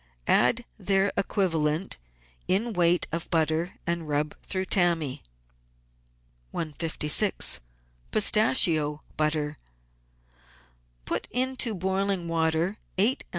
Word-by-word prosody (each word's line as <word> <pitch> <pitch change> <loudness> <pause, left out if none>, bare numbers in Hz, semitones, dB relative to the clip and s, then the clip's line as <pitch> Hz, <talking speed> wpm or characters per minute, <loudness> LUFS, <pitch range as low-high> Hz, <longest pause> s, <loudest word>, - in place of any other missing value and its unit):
Add - - +3
their 195 0 +1
equivalent 170 -4 0 0.5
in 220 +5 +1
weight 175 -1 +3
of 165 +1 -4
butter 160 +2 0
and 170 -2 -2
rub 150 0 -1
through 190 -1 -2
tammy. 170 -8 +1 1.3
156— 160 +4 +1 0.5
PISTACHIO 150 - +3
BUTTER 150 -1 0 1.5
Put - - -2
into 255 -3 +1
boiling 190 0 -1
water 165 +4 0 0.2
eight 220 +8 +4
oz. - - -38
170 Hz, 90 wpm, -26 LUFS, 155-195 Hz, 1.5 s, eight